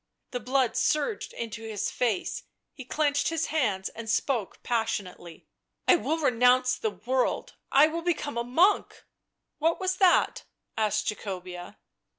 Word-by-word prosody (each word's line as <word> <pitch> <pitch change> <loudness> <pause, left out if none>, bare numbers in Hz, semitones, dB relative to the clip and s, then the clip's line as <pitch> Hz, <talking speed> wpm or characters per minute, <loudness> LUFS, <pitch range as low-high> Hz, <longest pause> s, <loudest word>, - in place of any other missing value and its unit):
The 245 - -3
blood 255 -1 +1
surged 400 +8 0
into 230 -1 -6
his 215 -2 -3
face; 230 -7 -1 0.3
he 260 - -10
clenched 290 +1 +1
his 330 -2 -1
hands 205 -11 0
and 230 -1 -8
spoke 230 -3 -1
passionately. 195 -7 -3 0.2
" - - -51
I 370 - +7
will 320 -1 -1
renounce 250 -2 +3
the 220 - -1
world, 250 +5 -1 0.2
I 280 +3 +7
will 325 +2 -2
become 330 -5 -2
a 235 - -1
monk. 335 +12 +3
..." - - -18
f< - - -22 0.6
What 325 +2 +1
was 375 -1 -1
that 370 -2 +3 0.2
?" - - -56
asked 215 -1 0
Jacobea. 185 -2 -5
250 Hz, 160 wpm, -27 LUFS, 215-305 Hz, 0.6 s, I